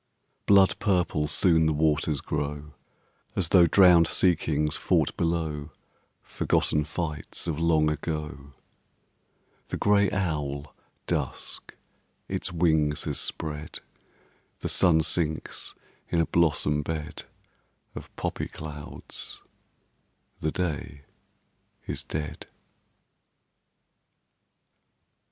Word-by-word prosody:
Blood 100 -2 +5
purple 90 -7 +1
soon 80 0 +3
the 80 - +2
waters 75 -1 +1
grow, 75 0 -4 0.6
As 90 -4 0
though 90 -3 +6
drowned 90 -2 +6
sea 90 0 +4
kings 75 -1 -1
fought - - +1
below 80 -3 -1 0.5
Forgotten 75 -1 0
fights 75 -1 -4
of 80 -3 -2
long 80 -2 +3
ago. 75 -3 -4 1.1
The - - -3
gray 100 -1 +3
owl 75 -7 -2 0.3
Dusk - - -4 0.5
its - - -3
wings 80 -4 +2
has - - -2
spread; 75 -1 -4 0.8
The - - -2
sun 85 -4 +4
sinks 80 -1 -2 0.3
in 85 - +1
a 85 - +3
blossom 75 -3 +2
bed 75 0 -5 0.7
Of - - -9
poppy - - -3
clouds; 75 -2 -8 1.0
the 80 - -1
day 75 -5 -3 0.8
is - - -4
dead. 75 0 -5
80 Hz, 95 wpm, -27 LUFS, 75-85 Hz, 1.1 s, though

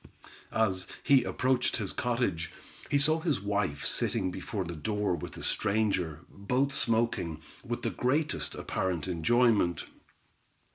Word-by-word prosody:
As 95 -4 +1 0.2
he 140 -3 +5
approached 130 -1 +1
his 105 -5 -2
cottage, 115 -9 -1 0.4
he 145 - +3
saw 155 +3 +5
his 160 - 0
wife 100 -7 -1
sitting 95 -5 0
before 95 +2 -4
the 85 0 -5
door 105 +4 -1
with 85 - -5
a - - -6
stranger, 95 -7 0
both 125 +8 -1
smoking, 115 - 0 0.2
with - - -4
the - - 0
greatest 145 +5 0
apparent 90 -3 -2
enjoyment. 100 +1 +2
105 Hz, 130 wpm, -30 LUFS, 90-125 Hz, 0.4 s, he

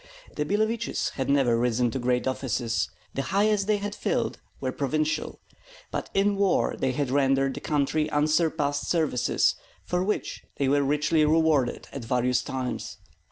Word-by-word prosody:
The 150 - -1
Billeviches 220 +6 0
had 135 - -3
never 130 -5 +3
risen 120 0 +1
to 130 - -3
great 125 0 0
offices, 125 -3 -1 0.2
the 135 - -1
highest 200 +4 +1
they 215 -1 +3
had 205 0 -4
filled - - -1 0.2
were 130 - -2
provincial; 155 +3 -1 0.5
but - - -4
in 200 +1 +2
war 195 -2 +2
they 130 - 0
had 140 -1 -1
rendered 135 -1 +2
the - - -6
country 150 +1 0
unsurpassed 150 -1 +1
services, 155 -7 +2 0.3
for 180 0 -1
which 210 +2 -2 0.2
they 140 - +1
were 145 +1 +3
richly 150 +3 +2
rewarded 150 -4 +2
at 140 - -6
various 125 +1 +1
times. 130 -1 -4
145 Hz, 155 wpm, -26 LUFS, 130-165 Hz, 0.5 s, never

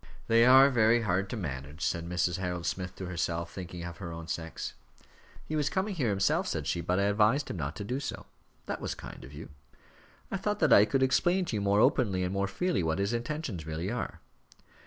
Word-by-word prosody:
"They 115 +1 +5
are 135 +2 +8
very 115 -1 +4
hard 95 -1 0
to 120 - -4
manage," 75 -3 -5
said 85 0 -2
Mrs. 90 0 0
Harold 90 -2 -3
Smith 90 -1 -3
to 95 - -6
herself, 85 -1 -2
thinking 90 -2 -7
of 85 0 -7
her 85 -4 -6
own 80 0 -7
sex. 80 -1 -4 0.7
"He 155 - -3
was 150 -1 +1
coming 195 +2 -1
here 135 - 0
himself," 95 -1 +1
said 75 - -2
she, 85 +5 -1
"but 90 +2 0
I - - +2
advised 105 +7 +2
him - - -5
not 75 -1 -3
to 100 - -5
do 125 +6 -2
so." 140 - -5 0.4
"That - - -4
was - - -2
so - - -15
kind - - -10
of 65 - -11
you." 75 +2 -9 0.8
"I - - 0
thought - - -1
that - - +4
I 100 - +8
could 130 +5 +1
explain 175 +8 +2
to 125 - -3
you 105 - -1
more 100 +1 +3
openly 115 -9 +2
and 90 +1 -2
more 100 0 0
freely, 100 - 0
what 80 0 0
his 100 +3 0
intentions 120 - -3
really 80 +5 -3
are." 120 - -4
100 Hz, 225 wpm, -30 LUFS, 85-120 Hz, 0.8 s, are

